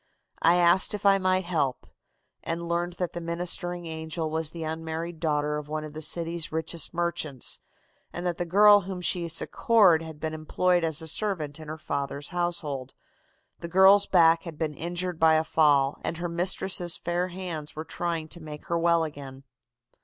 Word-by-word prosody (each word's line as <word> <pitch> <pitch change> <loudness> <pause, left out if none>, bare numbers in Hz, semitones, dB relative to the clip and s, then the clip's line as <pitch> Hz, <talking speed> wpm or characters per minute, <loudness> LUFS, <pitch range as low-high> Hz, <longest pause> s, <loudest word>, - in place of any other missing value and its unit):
I 170 +2 +5
asked 175 +3 +3
if 205 - -8
I 195 0 +5
might 185 0 +1
help, 155 -7 -1 0.6
and 170 +1 -4
learned 175 +1 -1
that 180 0 -4
the 175 - -5
ministering 175 +1 -1
angel 160 0 -4
was 160 -1 -2
the 165 0 -7
unmarried 160 +1 -5
daughter 150 -2 0
of 150 0 -7
one 155 0 -3
of 155 -1 -8
the 155 - -7
city's 165 +1 -1
richest 160 0 -1
merchants, 170 -6 -2 0.5
and 175 - -6
that 175 -1 -2
the - - +1
girl 205 +3 +6
whom 185 -1 -6
she 175 -1 0
succored 180 +1 +3
had 160 -2 -9
been 160 0 -3
employed 175 +3 +1
as 160 0 0
a - - -5
servant 160 -5 -1
in 155 - -10
her 155 +1 -6
father's 140 -1 -4
household. 165 -7 -3 0.6
The 170 - -6
girl's 190 +3 +6
back 165 -2 +5
had 165 -4 -9
been 155 -1 -2
injured 175 +2 -4
by 160 -1 +5
a 155 - +2
fall, 145 -4 +3
and 165 - -3
her 175 +1 -3
mistress' 175 0 +1
fair 175 +1 -1
hands 175 -5 -6
were 155 +1 -5
trying 165 -2 -3
to 170 - -6
make 150 -1 -9
her 170 0 +1
well 170 0 +3
again. 140 -3 -8
165 Hz, 185 wpm, -27 LUFS, 155-175 Hz, 0.6 s, girl